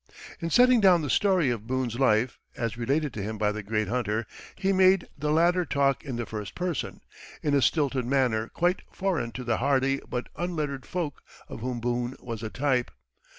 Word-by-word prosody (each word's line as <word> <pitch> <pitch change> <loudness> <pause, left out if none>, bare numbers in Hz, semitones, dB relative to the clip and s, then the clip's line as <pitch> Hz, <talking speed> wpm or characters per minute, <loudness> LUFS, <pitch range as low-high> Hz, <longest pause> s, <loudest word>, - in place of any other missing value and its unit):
In 165 - -3
setting 250 +3 +5
down 180 -5 +5
the 145 - -1
story 185 -9 +3
of 110 -2 -5
Boone's 125 -2 -2
life, 120 -1 +2 0.2
as 115 -1 -2
related 135 +4 0
to 105 - -4
him 110 +2 -4
by 105 0 +1
the 110 +1 -4
great 105 0 -1
hunter, 110 -1 -1 0.3
he 195 0 +1
made 185 -1 +4
the 150 +1 -2
latter 175 +3 +3
talk 140 -4 +1
in 135 -4 -5
the 120 0 -3
first 105 -3 -6
person, 180 -6 -3 0.4
in 145 - +1
a 140 - +4
stilted 135 -4 +1
manner 125 -4 +1
quite 175 +6 0
foreign 185 -11 -1
to 125 - -5
the 120 -2 0
hardy 135 +1 +1
but 125 0 -3
unlettered 155 -6 -3
folk 170 -6 -3 0.3
of - - -8
whom 125 +1 -3
Boone 120 +2 -2
was 115 -3 -6
a 110 - -4
type. 130 -1 0
130 Hz, 195 wpm, -27 LUFS, 115-165 Hz, 0.4 s, setting